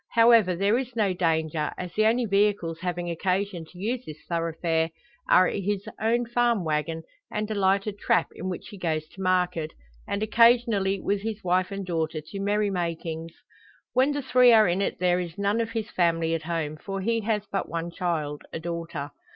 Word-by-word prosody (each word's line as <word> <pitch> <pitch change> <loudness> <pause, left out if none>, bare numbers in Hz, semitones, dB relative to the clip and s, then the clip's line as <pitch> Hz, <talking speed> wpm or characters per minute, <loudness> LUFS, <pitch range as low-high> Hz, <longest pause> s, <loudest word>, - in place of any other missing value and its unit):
However, 230 -5 +6
there 200 +6 +2
is 255 -2 -6
no 205 -4 +2
danger; 160 -3 0
as 180 -1 -6
the 215 0 +3
only 240 +2 +2
vehicles 200 -5 +1
having 175 -1 -3
occasion 185 0 -1
to 175 - -17
use 235 +6 -2
this 155 -7 -9
thoroughfare 165 -1 0 0.4
are 185 - +7
his 200 +1 -2
own 235 +2 +2
farm 235 -4 +1
waggon 160 +1 -1 0.3
and 210 +1 -3
a - - +1
lighter 195 +1 +2
`trap' 200 -4 +1
in 185 - -5
which 180 - -6
he 205 - -11
goes 155 -3 -1
to 190 - -11
market, 180 -4 0 0.3
and 200 +1 -1
occasionally 220 -3 +4
with 200 +2 -1
his 220 0 -4
wife 185 +1 +1
and 195 -1 -4
daughter 160 -3 -2
to 155 +6 -8
merry 205 +1 +1
makings. 165 -2 -3 0.6
When 260 +3 +3
the 290 -1 -2
three 250 -1 +6
are 220 -3 +6
in 180 +2 +1
it - - -1
there 180 0 +2
is 170 -2 -5
none 200 +3 +1
of 225 0 -4
his 220 -2 -3
family 165 -2 +1
at 165 - -1
home. 160 -2 -3
For 195 +4 -5
he 230 +3 +1
has 215 -2 0
but 195 - -2
one 170 +1 -3
child 155 -5 -2
a - - -4
daughter. 165 -3 -5
185 Hz, 190 wpm, -26 LUFS, 165-210 Hz, 0.6 s, are